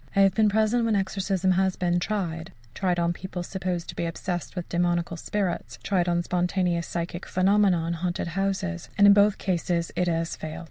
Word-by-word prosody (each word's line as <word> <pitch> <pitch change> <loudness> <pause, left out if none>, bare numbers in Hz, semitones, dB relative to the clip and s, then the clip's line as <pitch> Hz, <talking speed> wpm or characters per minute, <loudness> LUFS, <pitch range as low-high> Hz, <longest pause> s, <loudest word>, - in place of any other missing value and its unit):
I 200 - +5
have 195 -1 +5
been 215 +1 +3
present 220 +3 +2
when 225 -2 +2
exorcism 190 -1 0
has 190 0 +2
been 175 -1 +1
tried 175 -5 -3 0.2
tried 180 -3 0
on 170 0 +1
people 180 0 -6
supposed 180 -2 -3
to - - -6
be 170 - -2
obsessed 175 +2 -4
with 180 -2 -4
demoniacal 175 -1 0
spirits, 185 +1 -3
and - - -22
tried 180 -3 +1
on 175 0 +1
spontaneous 175 -1 0
psychic 170 +1 -4
phenomena 190 -2 +3
in 170 - -1
haunted 175 0 -2
houses 190 - -2
and 205 - +6
in 200 - +9
both 205 0 +4
cases 175 -2 -1
it 180 - +1
has 165 -1 -1
failed. 155 +1 -6
180 Hz, 195 wpm, -26 LUFS, 170-195 Hz, 0.2 s, in